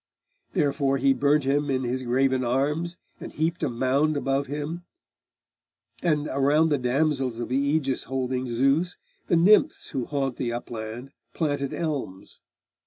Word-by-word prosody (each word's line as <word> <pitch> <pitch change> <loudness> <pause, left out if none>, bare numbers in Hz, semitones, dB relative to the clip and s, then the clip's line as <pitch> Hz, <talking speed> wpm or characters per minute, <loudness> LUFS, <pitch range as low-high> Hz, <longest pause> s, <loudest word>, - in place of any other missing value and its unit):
Therefore 140 -1 +1
he 135 +1 +3
burnt 145 +3 +2
him 145 +2 +1
in 130 -1 0
his 125 +1 -2
graven 130 +1 +1
arms, 150 +8 0 0.2
And - - -8
heaped 160 +3 -1
a - - +1
mound 135 +5 +1
above 135 0 0
him; 150 +5 -4 1.2
and 150 -3 +1
around 145 +4 +3
The 145 -3 +1
damsels 130 -1 0
of 120 - -4
the 130 - +1
Aegis 140 -1 0
holding 130 -1 -2
Zeus, 135 +9 +1 0.3
The - - +3
nymphs 190 +6 +4
who 130 -4 -3
haunt 135 -3 -2
the 120 -2 -2
upland, 120 +2 -6 0.2
planted 145 -4 -1
elms. 140 - -4
135 Hz, 145 wpm, -25 LUFS, 130-150 Hz, 1.2 s, nymphs